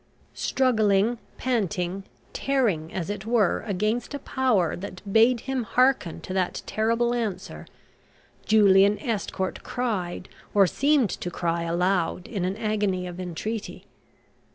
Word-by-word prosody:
Struggling, 220 Hz, -3 st, +2 dB, 0.2 s
panting, 195 Hz, -6 st, -1 dB, 0.3 s
tearing, 220 Hz, -, 0 dB
as 185 Hz, +1 st, -3 dB
it 205 Hz, -1 st, -5 dB
were, 225 Hz, -5 st, +2 dB
against 215 Hz, +7 st, -1 dB
a 280 Hz, -, -8 dB
power 220 Hz, -, +1 dB
that 185 Hz, 0 st, -7 dB
bade 230 Hz, +1 st, +5 dB
him 265 Hz, 0 st, -2 dB
hearken 250 Hz, -6 st, +1 dB
to 185 Hz, -, -6 dB
that 185 Hz, -1 st, -1 dB
terrible 230 Hz, +2 st, +1 dB
answer, 225 Hz, -6 st, -4 dB, 0.8 s
Julian 205 Hz, -1 st, +5 dB
Estcourt 205 Hz, -6 st, -3 dB
cried 195 Hz, -8 st, -3 dB, 0.3 s
or 200 Hz, -1 st, +7 dB
seemed 275 Hz, -, +2 dB
to 175 Hz, -, -4 dB
cry 170 Hz, -1 st, -1 dB
aloud 175 Hz, +1 st, 0 dB
in 195 Hz, -6 st, -2 dB
an 190 Hz, +2 st, -2 dB
agony 205 Hz, -4 st, -1 dB
of 180 Hz, 0 st, -7 dB
entreaty. 190 Hz, +5 st, -5 dB
205 Hz, 125 wpm, -25 LUFS, 185-235 Hz, 0.8 s, or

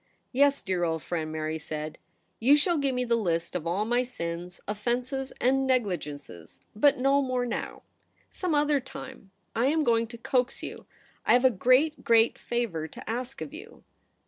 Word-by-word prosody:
* -, -, -45 dB
Yes, 280 Hz, +2 st, +3 dB
dear 185 Hz, -3 st, -1 dB
old 160 Hz, -3 st, -1 dB
friend,' 160 Hz, -1 st, -3 dB
Mary 155 Hz, 0 st, -3 dB
said; 155 Hz, 0 st, -5 dB, 0.2 s
' -, -, -44 dB
you 275 Hz, +6 st, +6 dB
shall 325 Hz, +2 st, +2 dB
give 275 Hz, -2 st, 0 dB
me 250 Hz, 0 st, 0 dB
the 235 Hz, -, +1 dB
list 170 Hz, -6 st, -1 dB
of 170 Hz, -2 st, -2 dB
all 190 Hz, +5 st, 0 dB
my 240 Hz, +2 st, +2 dB
sins, 175 Hz, -7 st, -5 dB
offences, 245 Hz, +6 st, -2 dB
and 265 Hz, +2 st, +2 dB
negligences 150 Hz, -, -2 dB
— -, -, -42 dB
but 285 Hz, -, +6 dB
no 275 Hz, +2 st, +3 dB
more 255 Hz, -2 st, 0 dB
now. 240 Hz, -, -4 dB, 0.5 s
Some 360 Hz, -5 st, -1 dB
other 295 Hz, -1 st, +3 dB
time. 260 Hz, -4 st, -10 dB, 0.3 s
I 235 Hz, +3 st, +2 dB
am 310 Hz, +2 st, +2 dB
going 230 Hz, -3 st, +2 dB
to 235 Hz, +1 st, -10 dB
coax 250 Hz, +2 st, 0 dB
you. -, -, -7 dB, 0.4 s
I -, -, +4 dB
have 250 Hz, +1 st, +4 dB
a 260 Hz, -, +7 dB
great, 255 Hz, +9 st, +3 dB
great 230 Hz, 0 st, +4 dB
favour 220 Hz, -10 st, -2 dB
to -, -, -12 dB
ask 250 Hz, +4 st, -4 dB
of 285 Hz, -, -6 dB
you. 425 Hz, +8 st, -11 dB
240 Hz, 190 wpm, -28 LUFS, 175-270 Hz, 0.5 s, a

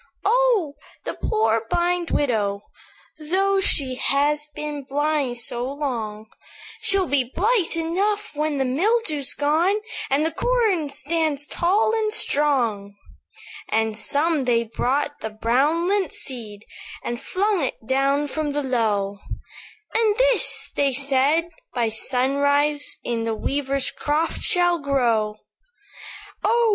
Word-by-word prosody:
"'Oh! 470 Hz, -11 st, +3 dB, 0.3 s
the -, -, -3 dB
poor, 220 Hz, +1 st, 0 dB
blind 350 Hz, 0 st, 0 dB
widow, 210 Hz, -7 st, 0 dB, 0.6 s
Though 385 Hz, +5 st, +1 dB
she 270 Hz, -8 st, +2 dB
has 295 Hz, +3 st, +1 dB
been 295 Hz, -1 st, -5 dB
blind 285 Hz, -2 st, -1 dB
so 240 Hz, +1 st, -1 dB
long, 230 Hz, -7 st, -4 dB, 0.6 s
She'll 390 Hz, -1 st, +3 dB
be 285 Hz, -5 st, +1 dB
blithe 405 Hz, -2 st, +1 dB
enough 390 Hz, +6 st, -1 dB
when 300 Hz, 0 st, -1 dB
the 270 Hz, -, +1 dB
mildew's 310 Hz, -, +1 dB
gone, 315 Hz, +7 st, +2 dB, 0.3 s
And 285 Hz, +3 st, +2 dB
the 325 Hz, -, 0 dB
corn 440 Hz, -12 st, +1 dB
stands 295 Hz, 0 st, -1 dB
tall 385 Hz, +8 st, +1 dB
and 435 Hz, -1 st, 0 dB
strong.' 240 Hz, -, +1 dB, 0.7 s
"And 220 Hz, -1 st, 0 dB
some 290 Hz, +5 st, +1 dB
they 235 Hz, -1 st, +2 dB
brought 270 Hz, +6 st, -1 dB
the 220 Hz, -, -4 dB
brown 265 Hz, +10 st, +1 dB
lint 390 Hz, -4 st, 0 dB
seed, 225 Hz, -6 st, -5 dB, 0.4 s
And 240 Hz, 0 st, -4 dB
flung 400 Hz, 0 st, 0 dB
it 255 Hz, -, -4 dB
down 275 Hz, +3 st, +1 dB
from 295 Hz, 0 st, -2 dB
the 290 Hz, 0 st, -1 dB
Low; 210 Hz, -6 st, 0 dB, 0.7 s
'And 440 Hz, -2 st, +2 dB
this,' -, -, +2 dB
they 280 Hz, -2 st, +1 dB
said, 285 Hz, +4 st, +2 dB, 0.3 s
'by 235 Hz, -2 st, +1 dB
sunrise, 285 Hz, +5 st, +1 dB
In 230 Hz, -1 st, -2 dB
the 225 Hz, -1 st, -1 dB
weaver's 275 Hz, +3 st, -1 dB
croft 305 Hz, +3 st, -1 dB
shall 350 Hz, -1 st, +3 dB
grow. 235 Hz, -7 st, +1 dB, 1.1 s
"'Oh! 460 Hz, +2 st, +3 dB
290 Hz, 125 wpm, -23 LUFS, 245-345 Hz, 1.1 s, Oh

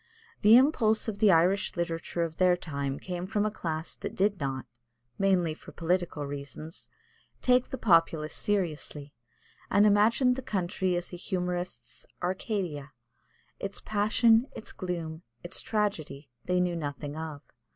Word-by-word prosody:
The 220 Hz, +2 st, +8 dB
impulse 235 Hz, -6 st, +3 dB
of 205 Hz, -2 st, -3 dB
the 215 Hz, -, +5 dB
Irish 185 Hz, +4 st, +3 dB
literature 170 Hz, 0 st, -2 dB
of 160 Hz, -1 st, -4 dB
their 180 Hz, -1 st, +4 dB
time 140 Hz, -5 st, -3 dB
came 180 Hz, +1 st, -5 dB
from 205 Hz, +1 st, 0 dB
a 215 Hz, -, 0 dB
class 160 Hz, -5 st, -4 dB
that -, -, -6 dB
did 200 Hz, 0 st, +1 dB
not 135 Hz, -2 st, -3 dB, 0.5 s
mainly 185 Hz, -5 st, +2 dB
for -, -, -13 dB
political 170 Hz, -3 st, -1 dB
reasons 145 Hz, +3 st, -8 dB, 0.5 s
take 250 Hz, 0 st, +4 dB
the 265 Hz, -, -4 dB
populace 165 Hz, -, +3 dB
seriously, 155 Hz, -7 st, -2 dB, 0.6 s
and 205 Hz, -, +5 dB
imagined 230 Hz, +5 st, +4 dB
the -, -, -3 dB
country 185 Hz, -4 st, -1 dB
as 175 Hz, +1 st, -4 dB
a -, -, -5 dB
humorist's 180 Hz, -8 st, -4 dB, 0.2 s
Arcadia; 180 Hz, -, -2 dB, 0.7 s
its 195 Hz, 0 st, -4 dB
passion, 225 Hz, +3 st, +3 dB
its -, -, -8 dB
gloom, 170 Hz, -3 st, -4 dB, 0.2 s
its 175 Hz, -, -3 dB
tragedy, 155 Hz, -, -2 dB
they 180 Hz, 0 st, +1 dB
knew 180 Hz, -1 st, +1 dB
nothing 145 Hz, -2 st, -4 dB
of. 155 Hz, -2 st, -6 dB
180 Hz, 140 wpm, -29 LUFS, 160-205 Hz, 0.7 s, The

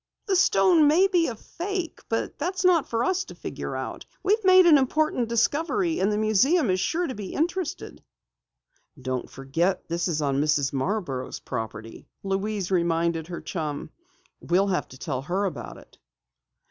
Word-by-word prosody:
"The 390 Hz, -, +1 dB
stone 355 Hz, -3 st, +5 dB
may 330 Hz, +6 st, +5 dB
be 360 Hz, -4 st, +2 dB
a 235 Hz, -, -4 dB
fake, 355 Hz, -, -5 dB
but 225 Hz, -, -2 dB
that's 365 Hz, +4 st, -2 dB
not 350 Hz, -4 st, +4 dB
for 230 Hz, 0 st, 0 dB
us 370 Hz, +4 st, +1 dB
to -, -, -11 dB
try -, -, -30 dB
to -, -, -31 dB
figure -, -, -5 dB
out. -, -, -5 dB, 0.2 s
We've 420 Hz, +3 st, +2 dB
made 370 Hz, -1 st, +7 dB
an 310 Hz, -4 st, +7 dB
important 265 Hz, -3 st, 0 dB
discovery 325 Hz, -, +1 dB
and 200 Hz, +2 st, +2 dB
the 210 Hz, -, 0 dB
museum 220 Hz, -, +3 dB
is 185 Hz, -, 0 dB
sure 340 Hz, -, 0 dB
to 260 Hz, -, -4 dB
be 205 Hz, -4 st, -7 dB
interested!" 345 Hz, +2 st, -3 dB, 1.0 s
"Don't 130 Hz, -1 st, -4 dB
forget 165 Hz, +8 st, -1 dB
that -, -, -42 dB
this 170 Hz, +1 st, -1 dB
is 160 Hz, -3 st, -1 dB
on 140 Hz, -2 st, 0 dB
Mrs. 150 Hz, -2 st, +1 dB
Marborough's 140 Hz, -3 st, -2 dB
property," 115 Hz, -2 st, -7 dB, 0.2 s
Louise 195 Hz, 0 st, -2 dB
reminded 170 Hz, -2 st, +1 dB
her 175 Hz, -1 st, -6 dB
chum. 155 Hz, -5 st, -4 dB, 0.5 s
"We'll 190 Hz, +3 st, +1 dB
have 185 Hz, -, -1 dB
to 130 Hz, -, -13 dB
tell 130 Hz, -3 st, -3 dB
her 185 Hz, +8 st, -1 dB
about 175 Hz, -7 st, -5 dB
it." -, -, -18 dB
210 Hz, 175 wpm, -25 LUFS, -, 1.0 s, made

